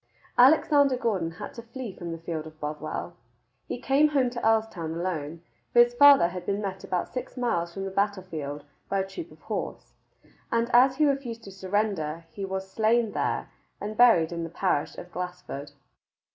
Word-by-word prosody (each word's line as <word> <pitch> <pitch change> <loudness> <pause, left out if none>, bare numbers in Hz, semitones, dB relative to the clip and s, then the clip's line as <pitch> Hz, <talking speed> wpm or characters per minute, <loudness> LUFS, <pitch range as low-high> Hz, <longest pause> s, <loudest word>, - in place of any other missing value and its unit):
Alexander 280 0 +5
Gordon 195 -9 0
had - - -8
to 235 - -8
flee 235 -2 -7
from 170 -1 -6
the 165 - -4
field 160 -1 -5
of 155 0 -14
Bothwell. 155 +3 -4 0.5
He - - -3
came 275 +4 +4
home 270 -5 +1
to 240 -1 -5
Earlstoun 220 -8 +1
alone, 165 -2 -3 0.3
for 240 - +4
his 240 0 -3
father 280 -8 +7
had 180 0 -6
been 200 +2 -1
met 190 -2 -4
about 180 -1 -2
six 255 +1 -5
miles 175 -9 0
from 195 +2 -5
the 195 - -4
battle 200 0 0
field 150 -5 -6 0.3
by 195 -1 +1
a 190 - -4
troop 325 - -7
of - - -17
horse, - - -5 0.6
and 230 +1 +1
as 260 +2 +6
he 305 +2 +3
refused 265 -5 -1
to 195 - -10
surrender, 190 -5 -2
he 200 - -6
was 190 0 -4
slain 225 +1 +2
there - - -2 0.3
and 210 +1 -5
buried 215 -9 +5
in 170 -1 -3
the 165 - -5
parish 170 -3 -1
of 175 - -9
Glassford. 180 -5 -6
195 Hz, 185 wpm, -27 LUFS, 170-240 Hz, 0.6 s, father